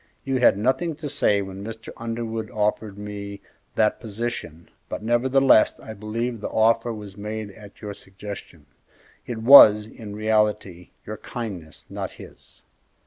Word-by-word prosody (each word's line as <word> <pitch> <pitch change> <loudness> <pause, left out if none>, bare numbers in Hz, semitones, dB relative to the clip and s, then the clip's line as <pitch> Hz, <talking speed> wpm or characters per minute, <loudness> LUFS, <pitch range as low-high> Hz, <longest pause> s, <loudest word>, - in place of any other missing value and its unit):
You 135 -1 -1
had 120 - +5
nothing 130 +9 0
to 155 0 -6
say 105 -8 +2
when 95 0 -8
Mr. 110 +1 -8
Underwood 115 -1 -4
offered 105 -1 -1
me 100 -1 -7 0.4
that 110 -1 +2
position, 110 -7 -5 0.2
but, - - -5
nevertheless, 125 +1 +4
I 110 - -9
believe 110 +2 -4
the - - -3
offer 115 +1 +2
was 105 -3 -8
made 105 0 -5
at 105 +2 -15
your 105 -1 -5
suggestion. 95 -6 -10 0.6
It 120 - -4
was, 110 -5 +9
in 105 -2 -10
reality, 105 -4 0 0.2
your 105 +1 -6
kindness, 100 -11 -7
not - - -6
his." - - -14
110 Hz, 140 wpm, -24 LUFS, 100-115 Hz, 0.6 s, was